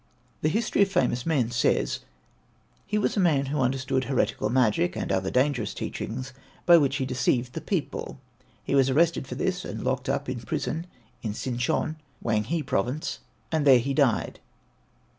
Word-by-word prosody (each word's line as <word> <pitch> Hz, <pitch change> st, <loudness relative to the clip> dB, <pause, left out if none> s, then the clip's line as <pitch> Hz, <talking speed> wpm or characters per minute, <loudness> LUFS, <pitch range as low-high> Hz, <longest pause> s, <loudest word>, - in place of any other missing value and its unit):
The 155 Hz, -, +2 dB
History 215 Hz, +4 st, +1 dB
of 200 Hz, -1 st, +4 dB
Famous 125 Hz, -5 st, +1 dB
Men 130 Hz, -8 st, +1 dB
says, 120 Hz, -, +1 dB, 0.9 s
"He 210 Hz, +2 st, 0 dB
was 210 Hz, -, +1 dB
a -, -, +1 dB
man 155 Hz, -7 st, +3 dB
who 140 Hz, +1 st, -1 dB
understood 130 Hz, 0 st, 0 dB
heretical 135 Hz, -3 st, 0 dB
magic, 105 Hz, -8 st, +2 dB
and -, -, -3 dB
other 95 Hz, 0 st, 0 dB
dangerous 130 Hz, -4 st, +1 dB
teachings 130 Hz, +4 st, -5 dB, 0.3 s
by 175 Hz, -1 st, +8 dB
which 140 Hz, -2 st, +1 dB
he 135 Hz, -1 st, -1 dB
deceived 125 Hz, -1 st, 0 dB
the 160 Hz, -, -4 dB
people. 170 Hz, -6 st, -3 dB, 0.4 s
He -, -, -3 dB
was 135 Hz, -1 st, +4 dB
arrested 155 Hz, 0 st, +2 dB
for -, -, -5 dB
this -, -, -1 dB
and -, -, -6 dB
locked -, -, -1 dB
up -, -, -1 dB
in -, -, -3 dB
prison 165 Hz, +2 st, -3 dB, 0.3 s
in 105 Hz, -2 st, -3 dB
Sin 120 Hz, 0 st, -3 dB
chon, 155 Hz, +4 st, 0 dB, 0.2 s
Whang 110 Hz, -2 st, 0 dB
hai 160 Hz, +6 st, -1 dB
Province, 130 Hz, -, -2 dB, 0.3 s
and 160 Hz, -2 st, +1 dB
there 135 Hz, -3 st, +7 dB
he 135 Hz, +3 st, -1 dB
died. 135 Hz, -6 st, +1 dB
135 Hz, 175 wpm, -26 LUFS, 120-155 Hz, 0.9 s, by